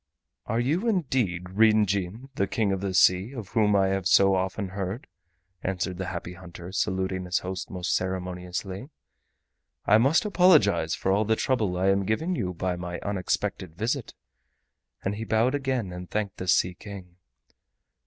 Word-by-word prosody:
"Are 115 - 0
you 160 - 0
indeed 130 - 0
Ryn 110 +1 +5
Jin, 100 +6 -3
the 100 -6 0
King 105 -1 0
of 95 -1 -1
the 95 -2 -2
Sea, 95 +6 +4
of 110 -6 -7
whom 105 -3 +3
I 95 -1 +3
have 95 -1 0
so 95 0 +5
often 95 +1 -1
heard?" 95 +4 -4 0.6
answered 95 -1 -2
the 95 - -3
Happy 90 -1 -5
Hunter, 90 0 -10
saluting 95 -1 -1
his 90 +1 0
host 95 0 -4
most 90 -2 -2
ceremoniously. 95 +4 -4 1.0
"I 105 +2 +6
must 140 - +3
apologize 155 - +4
for 95 +2 -1
all 100 +3 +3
the 110 +1 +2
trouble 110 -8 0
I 95 +2 +2
am 100 0 +2
giving 160 +12 0
you 90 - -2
by 90 +1 -2
my 90 0 -5
unexpected 95 -3 -2
visit." 115 +6 -2 0.9
And 100 +2 -2
he 110 - -4
bowed 115 +4 +2
again, 130 -9 -1
and 90 0 -8
thanked 105 -2 -2
the 95 - -5
Sea 90 0 +3
King. 90 -2 -11
95 Hz, 165 wpm, -26 LUFS, 90-110 Hz, 1.0 s, I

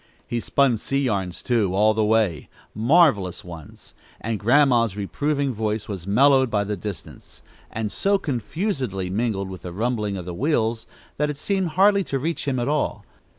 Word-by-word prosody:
He 120 - -2
spun 130 0 +2
sea 135 +5 -1
yarns, 95 -7 -2
too, 110 -7 +1
all 105 +2 +4
the 110 0 +1
way 105 -8 +1 0.2
marvelous 110 - +3
ones, 85 -4 -12 0.3
and 110 -1 -3
Grandma's 120 -3 +3
reproving 140 +6 -1
voice 110 -1 -2
was 95 -4 -6
mellowed 130 +4 +4
by 105 -2 +1
the 105 +1 -3
distance, 100 -3 -9 0.3
and 110 -2 -4
so 200 0 +1
confusedly 130 - -3
mingled 100 -2 -1
with 95 -2 -8
the 90 - -7
rumbling 105 0 -2
of 90 - -6
the 90 - -5
wheels, 115 - 0 0.3
that 150 +1 0
it 145 - -4
seemed 190 +3 -1
hardly 200 +1 +5
to 135 - -2
reach 155 +2 -3
him 135 -2 0
at 120 0 -1
all. 150 0 -1
115 Hz, 170 wpm, -23 LUFS, 100-140 Hz, 0.3 s, hardly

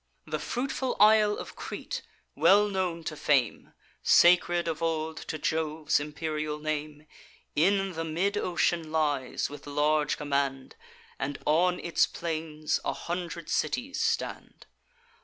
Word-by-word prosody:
The - - -3
fruitful 260 +1 -2
isle 210 0 +6
of - - -8
Crete, - - -5 0.3
well 205 +2 +5
known 180 -4 -2
to 155 - -4
fame, 135 -5 0 0.3
Sacred 175 0 +5
of 165 -1 -3
old 160 -1 -1
to 155 - -5
Jove's 155 -1 0
imperial 150 0 -3
name, 150 0 -4 0.5
In 195 +4 +2
the 165 0 -3
mid 175 +6 -1
ocean 175 -4 0
lies, 145 -5 0
with 145 +1 -11
large 150 0 +1
command, 140 -2 -2 0.4
And 140 +1 -3
on 180 +4 +3
its 170 - +2
plains 155 -2 -3
a - - -1
hundred 170 -1 -5
cities 255 +10 -1
stand. - - -2
160 Hz, 125 wpm, -28 LUFS, 150-180 Hz, 0.5 s, isle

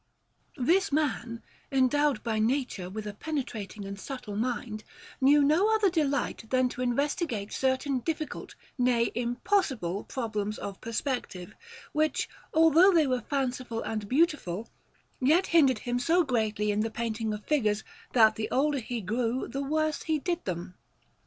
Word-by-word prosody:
This 340 +9 +2
man, 255 -6 -1 0.3
endowed 275 +2 +2
by 220 -2 -1
nature 225 -6 0
with 215 +2 -6
a 210 - -5
penetrating 220 -6 -5
and 195 0 -6
subtle 245 -4 -6
mind, 220 -1 -3 0.4
knew 285 +2 +6
no 335 +10 +4
other 415 -4 +3
delight 285 -8 -1
than 255 0 +2
to 245 - -6
investigate 250 - -1
certain 265 0 0
difficult, 310 +3 -4 0.2
nay, 245 -2 +2
impossible 245 - 0
problems 215 -4 -3
of 200 -1 -7
perspective, 225 -5 -3 0.4
which, 310 +1 +1 0.2
although 325 +4 +6
they 330 -4 +4
were 255 -2 0
fanciful 255 -3 -2
and 215 -2 -4
beautiful, 260 - +1 0.5
yet 315 +9 +4
hindered 280 -8 +4
him 245 +3 -2
so 335 +7 +3
greatly 220 -6 0
in 205 - 0
the 225 +1 0
painting 225 -1 -2
of 210 0 -5
figures, 220 -8 +1 0.3
that 220 -3 +5
the 215 - -2
older 285 +1 +1
he 240 -1 -4
grew 230 +5 -1
the 275 - -4
worse 310 +2 0
he 315 -1 0
did 345 +3 -2
them. 180 0 -4
250 Hz, 145 wpm, -28 LUFS, 220-295 Hz, 0.5 s, knew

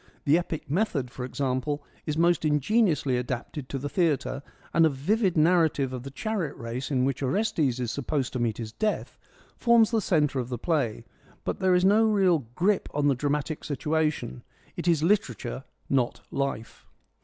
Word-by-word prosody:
The 145 +1 +5
epic 170 -2 -2
method, 145 - -1
for 125 - -6
example, 135 +2 -2 0.2
is 150 0 -1
most 170 -1 +3
ingeniously 150 - +2
adapted 125 +2 -4
to 140 - -3
the 140 +2 -4
theatre, 145 -4 0 0.3
and 165 - +5
a 160 - +6
vivid 180 - 0
narrative 155 -5 +3
of 125 - -4
the 135 - -7
chariot 185 0 -3
race 120 +3 -5
in 130 -3 +1
which 135 0 -1
Orestes 140 - 0
is 120 -3 -2
supposed 140 -1 -2
to 130 - -2
meet 115 -3 0
his 110 -2 -5
death 215 - -2 0.4
forms 235 -2 +4
the 225 -2 +2
centre 150 -7 +1
of 125 -1 -3
the 125 - -3
play, 135 -5 -1 0.4
but - - -3
there 185 -1 +3
is 180 +1 +3
no 210 +3 +5
real 190 - +3
grip 195 +5 +1
on 145 -1 +3
the - - +4
dramatic 145 +3 -2
situation: 150 - -1 0.3
it - - -4
is 165 -3 +3
literature, 135 - 0 0.2
not 130 -3 0
life. 135 -5 -4
145 Hz, 175 wpm, -27 LUFS, 130-175 Hz, 0.4 s, a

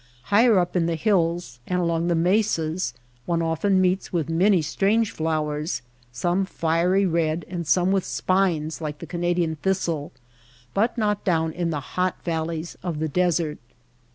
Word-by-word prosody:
Higher 225 0 +6
up 180 0 0
in 170 -2 +2
the 170 - 0
hills 170 - 0
and 180 0 0
along 170 -1 0
the 170 - +2
mesas 175 -2 +1 0.3
one 170 -1 +1
often 165 +4 +1
meets 185 +1 +1
with 165 -4 -1
many 185 +4 +4
strange 205 +8 +1
flowers, 155 -1 -2 0.3
some 175 +10 0
fiery 180 +2 +1
red 165 -2 0
and 175 -3 -5
some 180 +3 +3
with 195 -2 +2
spines 175 -5 0
like 150 -1 -4
the - - -8
Canadian 175 -2 -1
thistle; 170 -4 -1 0.6
but 225 +5 +1
not 210 -2 0
down 160 -3 +1
in 170 +1 -2
the 155 -3 -1
hot 185 0 0
valleys 165 0 -3
of 170 -4 -3
the 160 +1 -1
desert. 170 -2 0
170 Hz, 155 wpm, -24 LUFS, 160-185 Hz, 0.6 s, Higher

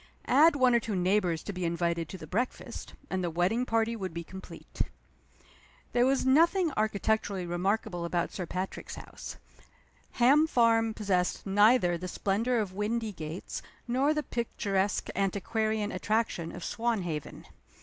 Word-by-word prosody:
Add 300 +4 +6
one 255 -3 +4
or 235 - +5
two 220 -2 -3
neighbors 180 -2 +1
to 205 - -5
be 185 -1 -4
invited 170 0 -1
to 190 - -6
the 160 - -9
breakfast 225 +11 -4 0.2
and 190 -1 -1
the 175 - 0
wedding 185 +9 +1
party 225 0 +1
would 190 -6 -5
be 170 - -3
complete. 190 +3 -8 1.1
There 245 +1 +3
was 270 0 +2
nothing 330 +5 +4
architecturally 210 -2 0
remarkable 175 +1 -1
about 170 0 -1
Sir 180 -3 -5
Patrick's 185 +3 -4
house. - - -9 0.8
Ham 280 +6 +5
Farm 225 -4 +3
possessed 185 -4 0
neither 200 -3 +4
the 185 - -5
splendor 215 +7 0
of 205 -4 -1
Windygates 210 -6 -3 0.3
nor 260 +5 +2
the 305 -1 0
picturesque 205 -6 -1
antiquarian 210 +2 0
attraction 185 -4 -1
of - - -8
Swanhaven. 190 -10 -2
205 Hz, 140 wpm, -29 LUFS, 180-235 Hz, 1.1 s, Add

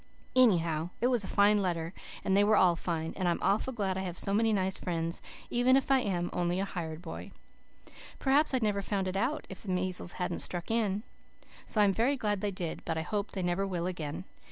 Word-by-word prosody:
Anyhow, 170 -10 +3
it 235 - 0
was 235 -4 +2
a - - -5
fine 205 +1 +4
letter, 170 -2 -2 0.3
and 190 - +2
they 200 - +5
were 215 +1 +4
all 175 -2 +5
fine, 165 -1 -3
and 185 - -1
I'm 170 - +2
awful 210 +6 +2
glad 195 -6 -1
I - - -1
have 180 -2 -4
so 195 - 0
many 225 +2 +3
nice 190 -2 +1
friends, 165 -1 -2 0.3
even 250 +2 +4
if 275 0 -1
I 270 - +6
am 180 -7 -1
only 175 +1 0
a 195 - 0
hired 165 -3 -5
boy. 165 - -7 0.9
Perhaps 285 +3 +3
I'd 250 - 0
never 205 -2 +1
have 195 - -6
found 195 -2 0
it 185 - -3
out 255 +10 -1
if 190 - -9
the 205 - -8
measles 180 -1 -1
hadn't 180 - -3
struck 175 +3 -3
in. 210 -3 +1 0.6
So 215 - +3
I'm 205 -1 +5
glad 225 -4 +1
they 205 - 0
did 180 -4 -4
but 165 -1 -2
I - - 0
hope 205 +4 -3
they 190 - -2
never 175 +3 0
will 175 -3 -2
again. 165 -3 -4
190 Hz, 225 wpm, -30 LUFS, 175-210 Hz, 0.9 s, I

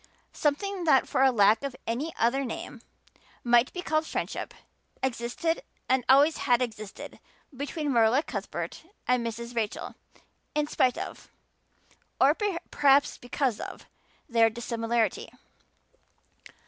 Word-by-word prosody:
Something 355 +5 -1
that 275 -5 +4
for 265 +1 +4
lack 215 -2 +4
of 275 -2 -4
any 260 +8 -2
other 250 +4 +2
name 240 -1 -6 0.6
might 240 +1 +4
be 360 - -6
called 310 0 0
friendship - - -4 0.5
existed 265 +6 -1 0.3
and 260 -1 +2
always 285 +4 +6
had 245 -3 +2
existed 215 -5 -6 0.4
between 290 +2 -3
Marilla 235 +5 +4
Cuthbert 195 - -5 0.2
and 250 -1 +2
Mrs. 235 +1 -5
Rachel, 220 -3 -3 0.6
in 300 0 +2
spite 255 -4 +1
of - - -7 0.9
or 275 +2 +6 0.4
perhaps 280 0 +4
because 245 -2 -1
of - - -8 0.4
their 230 -4 +4
dissimilarity. 230 0 -1
250 Hz, 115 wpm, -28 LUFS, 230-285 Hz, 0.9 s, always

